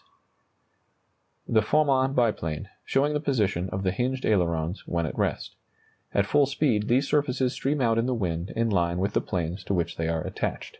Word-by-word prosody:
[Illustration: - - -4
The 110 - +6
Farman 135 +2 +2
biplane, 95 -11 0
showing 145 +2 +1
the 150 - +1
position 105 - 0
of 95 +1 -3
the 95 - +1
hinged 130 +6 -2
ailerons 85 -3 0
when 85 -1 -1
at - - -4
rest. - - -2 0.6
At 100 - +2
full 145 +5 +3
speed 130 -7 +1
these 130 +4 +2
surfaces 135 -3 +1
stream 135 +2 -1
out 115 -2 +3
in 115 - 0
the 130 - 0
wind 90 -4 -2
in 115 0 +1
line 85 -2 +1
with 100 +3 -1
the - - +2
planes 90 +1 -3
to 100 - 0
which 85 -1 -2
they 80 - -1
are 80 -1 -1
attached. - - -3
110 Hz, 190 wpm, -26 LUFS, 90-130 Hz, 0.6 s, The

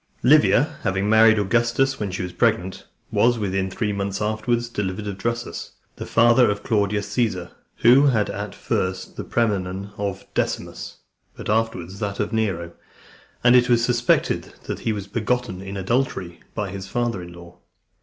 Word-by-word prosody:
Livia, - - +4
having 95 +1 0
married 110 0 +6
Augustus 120 +6 +1
when 105 -2 -2
she 95 0 -4
was 90 - -6
pregnant, 105 -6 0 0.2
was 120 0 +3
within 95 -2 -1
three 105 +2 -2
months 100 0 -3
afterwards 110 +3 -1
delivered 105 -2 -3
of 100 -1 -4
Drusus, 115 0 -4 0.2
the - - -6
father 120 +1 +5
of 105 0 -2
Claudius 105 -1 0
Caesar, 105 -6 -1 0.3
who 130 +5 +7
had 110 -6 +2
at - - -5
first 95 0 -2
the - - -5
praenomen 100 -3 -1
of 100 -2 -3
Decimus, - - -3 0.4
but - - -7
afterwards 100 -4 -1
that 100 -2 -3
of 105 +2 -1
Nero; 95 -7 -1 0.7
and 125 0 +6
it 125 0 +5
was 120 -1 +4
suspected 120 -1 +1
that - - -5
he 115 - -1
was 100 -2 -4
begotten 110 -1 -2
in 100 0 -6
adultery 95 -4 -1 0.2
by 100 -3 -3
his 95 0 -6
father 120 -3 -1
in 85 0 -10
law. 85 0 -14
105 Hz, 165 wpm, -23 LUFS, 95-115 Hz, 0.7 s, who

